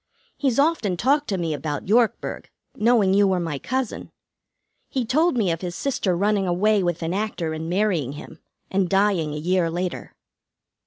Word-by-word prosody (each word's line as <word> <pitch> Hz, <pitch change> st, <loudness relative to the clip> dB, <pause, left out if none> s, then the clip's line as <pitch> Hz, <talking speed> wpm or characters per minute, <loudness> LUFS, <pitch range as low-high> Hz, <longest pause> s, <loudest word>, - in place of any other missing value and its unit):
He's 265 Hz, -5 st, 0 dB
often 280 Hz, -, +2 dB
talked 285 Hz, -, +2 dB
to 195 Hz, -, -1 dB
me 165 Hz, -3 st, -1 dB
about 150 Hz, +1 st, -4 dB
Yorkburg, 230 Hz, +2 st, +1 dB, 0.3 s
knowing 215 Hz, -4 st, +3 dB
you 200 Hz, 0 st, +4 dB
were 190 Hz, -1 st, +1 dB
my 165 Hz, -5 st, -3 dB
cousin. 260 Hz, -, -3 dB, 0.8 s
He 260 Hz, -3 st, -1 dB
told 310 Hz, +5 st, +2 dB
me 200 Hz, -7 st, +2 dB
of 165 Hz, -, -3 dB
his 175 Hz, -2 st, -4 dB
sister 200 Hz, -10 st, -1 dB
running 200 Hz, 0 st, +1 dB
away 205 Hz, +4 st, +2 dB
with 175 Hz, -2 st, -1 dB
an 165 Hz, +2 st, -2 dB
actor 195 Hz, -6 st, -2 dB
and 160 Hz, +1 st, -5 dB
marrying 175 Hz, -8 st, 0 dB
him, 145 Hz, -, -11 dB, 0.3 s
and 190 Hz, -2 st, +1 dB
dying 195 Hz, -6 st, +2 dB
a 150 Hz, -, -4 dB
year 175 Hz, +2 st, +1 dB
later. 175 Hz, +1 st, -4 dB
190 Hz, 170 wpm, -23 LUFS, 170-220 Hz, 0.8 s, you